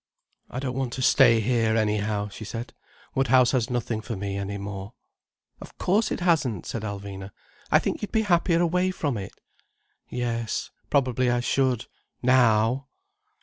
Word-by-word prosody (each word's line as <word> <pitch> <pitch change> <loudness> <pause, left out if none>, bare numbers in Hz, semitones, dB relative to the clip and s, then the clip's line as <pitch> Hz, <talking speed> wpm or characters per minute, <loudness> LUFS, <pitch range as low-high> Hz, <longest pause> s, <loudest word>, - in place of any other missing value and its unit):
"I - - -7
don't 130 -1 -2
want 130 -2 -2
to 130 - -3
stay 120 -4 +6
here, 115 -1 +1
anyhow," 105 -1 0
she 105 - -9
said. 115 +3 -6 0.4
"Woodhouse 130 -1 +4
has 130 -2 0
nothing 120 -2 -2
for 115 +1 -5
me 100 0 -4
any 100 0 -3
more." 100 +1 -6 0.7
"Of - - -12
course 205 +5 +2
it - - -3
hasn't," 150 - +1
said 115 - -4
Alvina. 100 -2 -6 0.4
"I - - +6
think - - -2
you'd 210 - -4
be 220 -1 +2
happier 175 -3 +2
away 180 +2 +2
from 150 -8 -2
it." 100 -2 -6 0.7
"Yes—probably 125 +2 -1
I 120 0 +2
should—now!" 125 -1 +1
120 Hz, 150 wpm, -26 LUFS, 105-135 Hz, 0.7 s, stay